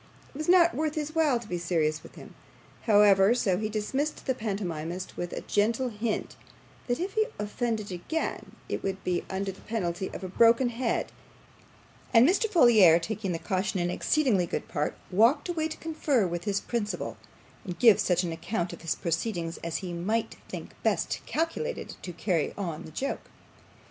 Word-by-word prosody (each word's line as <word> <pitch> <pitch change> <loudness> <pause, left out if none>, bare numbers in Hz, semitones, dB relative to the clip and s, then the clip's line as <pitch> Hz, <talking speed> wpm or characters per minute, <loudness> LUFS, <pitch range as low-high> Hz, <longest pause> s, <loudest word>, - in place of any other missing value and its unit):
It - - -10
was 310 - -2
not 345 -2 +6
worth 310 0 -1
his 305 0 -3
while 305 -7 +3
to 230 - -11
be 175 -3 -3
serious 160 -3 0
with - - -14
him, - - -12 0.5
however, 205 0 +6
so 190 -6 +1
he 215 0 -2
dismissed 265 +8 -2
the 260 - +1
pantomimist, 185 -6 -4
with 175 0 -4
a - - -4
gentle 230 +5 +1
hint 215 0 -3 0.5
that 245 -1 0
if 375 +3 -3
he 435 0 +2
offended 215 0 -2
again 185 - -3
it - - -3
would 195 -1 -3
be 180 -1 0
under 195 +1 -2
the 190 - -15
penalty 190 -4 -2
of - - -8
a - - -3
broken 230 +6 +4
head; 235 0 -1 1.0
and 230 +3 +8
Mr. 410 +6 +2
Folair, 220 - +7
taking 200 +2 -3
the 170 - -1
caution 190 +1 -1
in 175 0 0
exceedingly 225 - +2
good - - -3
part, 150 -1 -2 0.2
walked 235 - +4
away 320 -2 0
to 315 - -7
confer 300 -8 0
with 175 -1 -3
his 200 -1 +1
principal, 220 -3 -3 0.5
and 180 -6 -6
give 220 0 +6
such 180 -3 +2
an 170 - -2
account 175 +2 -3
of - - -10
his 165 - -1
proceedings 170 0 -2
as 165 -1 -2
he 175 - -4
might 215 +7 -1
think - - -7
best - - 0
calculated 330 +10 -2
to 180 - -6
carry 170 -1 -1
on 170 -6 -4
the - - -10
joke. 270 - -4
210 Hz, 180 wpm, -28 LUFS, 175-250 Hz, 1.0 s, and